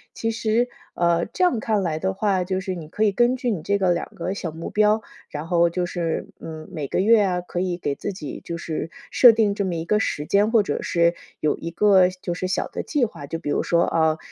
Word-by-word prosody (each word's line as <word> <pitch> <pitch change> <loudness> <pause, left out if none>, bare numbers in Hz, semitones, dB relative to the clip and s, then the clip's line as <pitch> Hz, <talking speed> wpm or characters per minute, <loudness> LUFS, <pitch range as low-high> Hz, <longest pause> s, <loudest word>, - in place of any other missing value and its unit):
其 225 - -2
实， 225 +2 +1 0.3
呃， 170 -1 +2
这 360 - -2
样 310 -11 +3
看 215 -2 0
来 160 -3 -1
的 190 +3 -1
话， 195 -2 +1
就 185 +1 -2
是 190 -1 -4
你 160 -3 -8
可 210 - -1
以 210 - +4
根 240 +5 +3
据 250 -1 -2
你 190 -7 -2
这 200 - +1
个 185 -2 +3
2 170 - -3
个 180 +2 -3
小 170 -4 -4
目 165 +2 -6
标， 210 +1 +3 0.3
然 150 +2 -6
后 170 -1 +3
就 180 +1 -1
是， 170 -3 -2
嗯， 155 -1 -8
每 145 -3 -4
个 - - -1
月 220 +2 +5
啊， 180 -2 0
可 175 0 -5
以 180 -1 -1
给 145 -5 -2
自 200 - -4
己 155 -7 -7
就 170 - -5
是 165 -1 -4 0.2
设 245 - +8
定 220 -2 +2
这 200 - -1
么 180 - -2
一 165 0 -3
个 210 +4 +2
时 150 -8 -2
间， 205 +2 +3
或 230 -3 +5
者 - - -2
是 170 0 +2 0.2
有 155 - +1
一 170 - -6
个 190 0 +5
就 185 -1 -5
是 185 - -3
小 190 - -1
的 - - -5
计 290 -5 +1
划。 175 -9 -8
就 165 - -3
比 145 - -5
如 - - +1
说， 170 0 +2
啊， 160 -2 +2
185 Hz, 270 characters per minute, -23 LUFS, 170-210 Hz, 0.3 s, 设